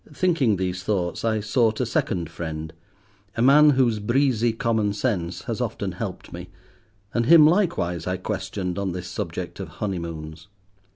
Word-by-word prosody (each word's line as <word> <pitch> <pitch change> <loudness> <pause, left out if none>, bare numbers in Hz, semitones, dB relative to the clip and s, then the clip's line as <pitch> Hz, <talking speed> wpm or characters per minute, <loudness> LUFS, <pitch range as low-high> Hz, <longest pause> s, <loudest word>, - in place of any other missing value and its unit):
Thinking 150 - +2
these 90 -1 -2
thoughts, 90 -3 -2
I 110 -1 +1
sought 110 +1 +1
a 125 - +1
second 90 -6 -1
friend—a 85 +6 -9
man 150 +3 +7
whose 125 -6 +2
breezy 120 +1 +2
common 110 -2 0
sense 95 -6 -2
has - - -4
often - - -3
helped - - -6
me, 90 +1 -8 0.6
and 120 0 0
him 165 -2 +8
likewise 155 - +1
I 90 +1 -1
questioned 90 0 -4
on 95 -3 -2
this 90 0 -6
subject - - -5
of - - -5
honeymoons. 85 -4 -5
100 Hz, 150 wpm, -24 LUFS, 90-120 Hz, 0.6 s, him